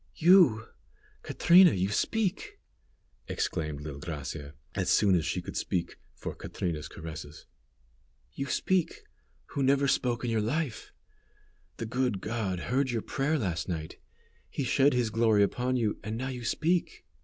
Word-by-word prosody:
"You! 160 - +5 0.6
Catrina, 175 0 +6
you 95 +1 0
speak!" 225 - -1 0.7
exclaimed 75 -4 -2
little 75 -1 -7
Gracia, 75 -1 -6 0.2
as - - -1
soon 100 -2 +4
as 85 -3 +2
she - - -2
could - - -8
speak, 90 - -2 0.2
for - - -6
Catrina's 80 -4 -4
caresses. 75 -2 -9 0.9
"You 135 - -4
speak, 185 +5 0 0.5
who 140 - -3
never 140 +1 +3
spoke 125 -2 0
in 120 - -1
your 110 -1 +1
life. 130 +3 -2 0.9
The 115 - -4
good 125 -3 -1
God 100 -4 -3
heard 130 +5 0
your 115 -3 -2
prayer 145 +4 0
last 90 - -2
night. 80 -3 -5 0.5
He 140 - -3
shed 135 +3 +3
His 120 -3 +1
glory 110 -2 +4
upon 125 +5 0
you, 110 -4 -1
and 110 +1 -4
now 130 +2 -3
you 125 -2 -6
speak." 170 +8 0
115 Hz, 145 wpm, -29 LUFS, 90-140 Hz, 0.9 s, Catrina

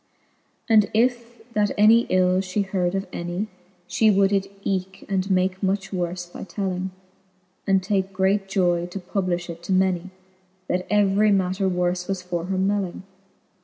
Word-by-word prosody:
XXXV. 230 - +1
And 210 -2 +5
if 240 0 -1
that 210 -2 +2
any 225 +3 +6
ill 185 0 +3
fhe 195 +2 -1
heard 185 -1 -1
of 195 +1 -1
any, 175 +5 -3 0.4
She 220 +4 +3
would 195 -1 +4
it 195 0 0
eeke, 190 0 -3
and 195 -1 -1
make 185 0 +1
much 195 0 -1
worfe 175 -1 -3
by - - -7
telling, 190 -2 -3 0.8
And 195 -1 +3
take 190 0 0
great 195 +1 +1
joy 175 -3 +1
to 180 - -7
publifh 180 -1 -2
it 170 -1 -8
to 175 - -5
many, 185 -1 +1 0.6
That 180 0 -1
every 205 0 +3
matter 190 0 +1
worfe 180 0 -1
was 190 -2 -3
for 175 -2 -3
her 190 +1 -2
melling. 195 -1 -1
190 Hz, 165 wpm, -24 LUFS, 180-200 Hz, 0.8 s, any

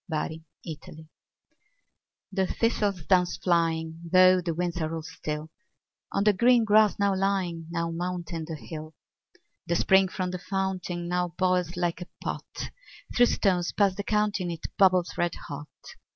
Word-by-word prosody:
Autumn 155 0 -6 1.2
The 190 -1 +1
thistle 220 -2 +1 0.2
down's 180 -2 +3
flying, 165 -2 0
though 185 0 +7
the 170 -2 -2
winds 175 0 -2
are 160 +1 -2
all 160 - -5
still, 155 -1 -5 0.6
On 200 - +1
the 210 0 +5
green 235 +3 +4
grass 215 -1 +5
now 200 -1 +2
lying, 185 -4 -1
now 170 0 -2
mounting 170 -1 -4
the 160 0 -5
hill, 155 +5 -8 0.7
The 170 - +1
spring 190 +2 +4
from 185 -1 -3
the 180 - -4
fountain 185 -2 -3
now 180 -1 -1
boils 180 -2 +1
like 175 -1 -1
a 180 - -6
pot; - - -5 0.4
Through 245 0 +6
stones 180 -6 +1
past 200 -3 +3
the 205 - -4
counting 205 -3 0
it 165 -2 -5
bubbles 185 -2 +3
red 175 -1 +1
hot. 145 0 -8
180 Hz, 150 wpm, -27 LUFS, 165-190 Hz, 1.2 s, though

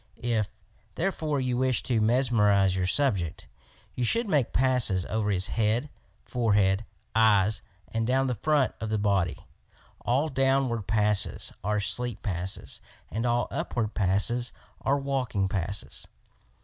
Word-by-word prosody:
If, 115 -3 -1 0.5
therefore, 160 -5 -1
you 125 -2 -1
wish 130 -1 +1
to 115 -4 +1
mes 125 +4 +2
merize 100 -4 +3
your 90 -1 0
subject, 95 - 0 0.5
you 125 - -2
should 230 - +2
make 145 - +1
passes 125 -8 +3
over 110 -1 -1
his 95 -2 0
head, 115 +6 0 0.3
forehead, 105 -4 +1 0.3
eyes 110 -2 +3 0.3
and 115 0 -2
down 130 +1 +2
the 130 - 0
front 140 +4 +1
of 110 - -3
the 110 - 0
body. 100 -5 0 0.5
All 135 +6 +1
downward 135 -5 +1
passes 105 -1 +1
are 105 +1 0
sleep 105 +3 -1
passes 95 -1 -4 0.3
and 115 +3 -1
all 120 0 +1
upward 110 -3 -2
passes 105 +5 +1 0.3
are 140 - +1
waking 130 -8 -1
passes. 100 +1 -3
115 Hz, 135 wpm, -27 LUFS, 100-130 Hz, 0.5 s, merize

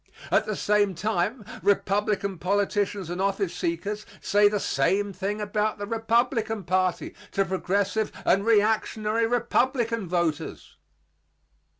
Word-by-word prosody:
At - - +3
the 215 - -1
same 205 -1 +2
time, 210 +4 -1 0.2
Republican 200 -1 +1
politicians 200 -1 0
and 180 +2 -3
office 195 -2 0
seekers 190 +5 -3 0.2
say 205 0 +4
the 210 0 -1
same 200 +1 +1
thing 200 +3 -3
about 210 +1 -1
the 205 - -4
Republican 225 0 0
party 185 0 0 0.2
to 195 - +2
progressive 200 +3 0
and 195 - +3
reactionary 220 0 +2
Republican 240 -2 0
voters. 165 -3 -2
205 Hz, 115 wpm, -26 LUFS, 190-215 Hz, 0.2 s, say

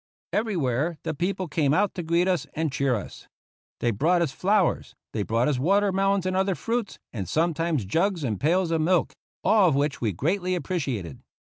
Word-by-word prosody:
Everywhere 165 - 0
the - - -2
people 185 +4 -2
came 150 -1 +1
out 205 +2 +2
to 180 - -4
greet 170 +2 +1
us 185 -2 0
and 160 -1 -1
cheer 135 -2 +1
us. 105 - -8 0.5
They 120 - +2
brought 170 - +2
us 155 - -2
flowers; 195 +4 +1 0.2
they 110 - -1
brought 115 +4 +1
us 140 -4 0
watermelons 195 +3 +2
and 185 0 0
other 190 0 +1
fruits, 230 0 -3 0.2
and 95 -7 -4
sometimes 165 - 0
jugs 170 - 0
and 110 -7 -2
pails 170 +3 +2
of 165 -1 +1
milk 175 +1 +2 0.2
— - - -81
all 200 -2 +5
of 145 - +1
which 140 0 0
we 110 -3 +1
greatly 180 - -1
appreciated. 135 - -3
165 Hz, 190 wpm, -25 LUFS, 140-185 Hz, 0.5 s, all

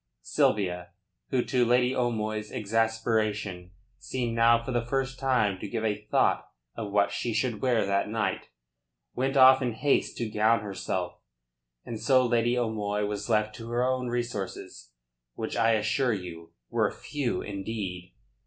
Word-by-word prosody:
Sylvia, 90 - 0 0.4
who 125 -2 +1
to 125 -2 +2
Lady 125 +2 +3
O'Moy's 110 -4 -1
exasperation 110 -4 -1 0.3
seemed 120 -3 -3
now 115 0 +4
for 130 - -4
the 120 -2 0
first 135 +2 -2
time 125 -8 +1
to 105 - -5
give 110 +2 -3
a 105 -1 -1
thought - - +2 0.3
to 110 - -4
what 100 0 +1
she 115 0 -2
should 115 -2 -1
wear 120 -5 +2
that 100 +1 0
night, 110 -1 -2 0.7
went 135 +2 0
off 130 0 +8
in 125 -3 -1
haste 140 +5 +1
to 120 - -2
gown 110 +1 +2
herself, 95 -3 -4 0.7
and 115 -2 -5
so 130 +3 +4
Lady 120 0 +2
O'Moy 105 -3 -1
was 105 +1 -4
left 110 -1 +2
to 115 0 -8
her 120 +1 +1
own 130 0 0
resources 120 - -4 0.5
which - - -4
I 115 0 +3
assure 110 +4 +1
you 85 -4 -7 0.2
were - - +2
few 140 -5 -3
indeed. 95 -3 -5
110 Hz, 155 wpm, -28 LUFS, 105-120 Hz, 0.7 s, off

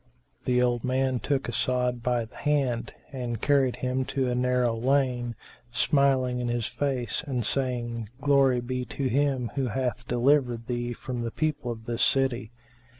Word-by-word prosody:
The 125 -1 +3
old 120 -2 +1
man 130 0 +1
took 140 +1 -1
As'ad 125 0 0
by 120 -1 0
the 110 - -16
hand 135 -6 0 0.2
and 120 -4 -3
carried 135 -2 +3
him 130 +1 0
to 130 -2 -1
a - - +1
narrow 125 -1 +2
lane, 125 -1 +1 0.4
smiling 130 -1 +2
in 120 - -2
his 120 -1 -1
face 130 -6 -1
and 125 -5 -1
saying, 120 -4 -2
"Glory 135 -3 +4
be 125 +1 -3
to 135 +2 -3
Him 135 -2 +1
who 135 -2 0
hath 125 0 -2
delivered 125 -1 +2
thee 120 0 -2
from 125 +1 -5
the 115 - -2
people 150 -1 -2
of 110 -1 -6
this 120 -1 -2
city!" 130 -4 +2
125 Hz, 160 wpm, -27 LUFS, 120-135 Hz, 0.4 s, Glory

